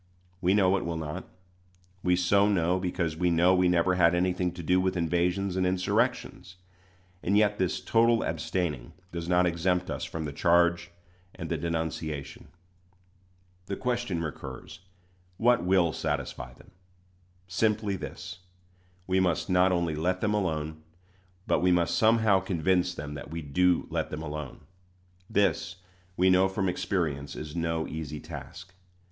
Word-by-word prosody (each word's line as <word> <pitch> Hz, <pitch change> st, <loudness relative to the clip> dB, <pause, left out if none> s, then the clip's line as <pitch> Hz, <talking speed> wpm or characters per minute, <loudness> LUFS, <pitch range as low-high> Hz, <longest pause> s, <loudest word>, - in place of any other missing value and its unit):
We 95 Hz, +2 st, +3 dB
know 95 Hz, -1 st, +4 dB
it -, -, -3 dB
will 85 Hz, -1 st, -3 dB
not. 75 Hz, -2 st, -5 dB, 0.7 s
We 90 Hz, -1 st, +3 dB
so 100 Hz, +3 st, +3 dB
know, 90 Hz, -2 st, +2 dB
because 90 Hz, -3 st, -2 dB
we 90 Hz, +2 st, +1 dB
know 85 Hz, +2 st, +4 dB
we 90 Hz, -1 st, +3 dB
never 90 Hz, +1 st, +3 dB
had 90 Hz, -1 st, +4 dB
anything 90 Hz, 0 st, 0 dB
to 90 Hz, -1 st, -8 dB
do 90 Hz, +3 st, +3 dB
with 95 Hz, 0 st, 0 dB
invasions 90 Hz, +3 st, 0 dB
and 95 Hz, -, +1 dB
insurrections; 95 Hz, 0 st, -1 dB, 0.7 s
and 100 Hz, +3 st, +2 dB
yet 105 Hz, -1 st, +2 dB
this 95 Hz, -1 st, 0 dB
total 115 Hz, 0 st, +3 dB
abstaining 75 Hz, -10 st, -3 dB, 0.2 s
does 85 Hz, 0 st, -5 dB
not 90 Hz, 0 st, +4 dB
exempt 90 Hz, +1 st, 0 dB
us -, -, -4 dB
from 80 Hz, -1 st, -4 dB
the 70 Hz, -, -5 dB
charge 85 Hz, +2 st, +3 dB, 0.5 s
and -, -, -6 dB
the -, -, 0 dB
denunciation. 80 Hz, -4 st, -4 dB, 1.2 s
The 100 Hz, -, -2 dB
question 120 Hz, -9 st, -2 dB
recurs, 80 Hz, +2 st, -7 dB, 0.6 s
What 120 Hz, -2 st, +3 dB
will 90 Hz, -3 st, +3 dB
satisfy 65 Hz, -5 st, -4 dB
them? -, -, -19 dB, 0.8 s
Simply 105 Hz, +2 st, 0 dB
this: 90 Hz, 0 st, -8 dB, 0.7 s
we 95 Hz, 0 st, +1 dB
must 90 Hz, 0 st, 0 dB
not 90 Hz, +1 st, +4 dB
only 85 Hz, -3 st, 0 dB
let 90 Hz, +4 st, 0 dB
them 105 Hz, +1 st, 0 dB
alone, 80 Hz, -6 st, -2 dB, 0.6 s
but -, -, +2 dB
we 90 Hz, 0 st, +3 dB
must 85 Hz, -1 st, +2 dB
somehow 110 Hz, -3 st, +4 dB
convince 90 Hz, 0 st, 0 dB
them 75 Hz, -1 st, -6 dB
that 75 Hz, -, -8 dB
we 80 Hz, 0 st, -5 dB
do 90 Hz, +5 st, +2 dB
let -, -, -1 dB
them 75 Hz, +1 st, -5 dB
alone. 75 Hz, -3 st, -6 dB, 0.7 s
This, 100 Hz, -2 st, +1 dB, 0.4 s
we 95 Hz, +1 st, +4 dB
know 95 Hz, +1 st, +4 dB
by 95 Hz, +1 st, -2 dB
experience, 85 Hz, -6 st, -2 dB
is 75 Hz, +1 st, -7 dB
no 80 Hz, -1 st, -1 dB
easy 75 Hz, -1 st, -5 dB
task. 80 Hz, +5 st, -10 dB
90 Hz, 150 wpm, -28 LUFS, 80-95 Hz, 1.2 s, know